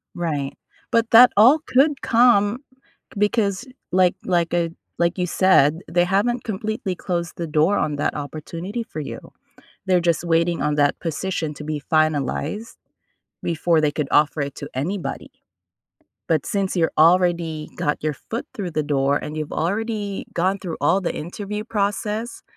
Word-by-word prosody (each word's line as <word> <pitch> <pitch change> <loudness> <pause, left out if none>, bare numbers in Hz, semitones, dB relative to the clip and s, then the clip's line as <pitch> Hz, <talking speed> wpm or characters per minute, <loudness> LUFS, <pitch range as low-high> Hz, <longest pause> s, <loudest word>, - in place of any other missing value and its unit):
Right, 150 -5 -3 0.4
but 230 0 +2
that 245 +2 +8
all 245 +9 +7
could 275 +2 +3
come, 230 -2 +4 0.6
because 205 +1 +1 0.3
like 180 -1 +3
like 175 -2 +1
a 170 -1 +1 0.3
like 170 +2 +1
you 180 - 0
said, 165 -5 +4
they 175 0 +3
haven't 205 +7 +1
completely 215 -2 -3
closed 170 -1 -3
the 170 - -3
door 155 +6 +2
on 150 -1 0
that - - -1
opportunity 165 +9 -5
for 155 - -8
you. 150 - -6 0.7
They're 185 -2 +3
just 170 -2 +1
waiting 170 0 +1
on 150 - +1
that 145 -1 +2
position 165 -1 -3
to 150 - -9
be 150 -1 -4
finalized 155 - 0 0.7
before 165 -1 +1
they 150 -1 +2
could 145 -1 -2
offer 150 0 +3
it 140 -1 -4
to - - -7
anybody. 170 +8 -4 1.0
But, 155 -4 +1
since 195 -2 -1
you 165 -2 +3
already 170 -2 +3
got 150 - -1
your 155 0 0
foot 230 - -6
through 185 -5 -5
the 155 - 0
door 140 -1 +1
and 150 +1 -4
you've 155 -1 -4
already 205 +2 -2
gone 185 +3 +1
through 180 -4 -5
all 165 +7 +3
the 180 - -2
interview 205 +6 -5
process, 210 +1 -2
175 Hz, 155 wpm, -22 LUFS, 155-205 Hz, 1.0 s, that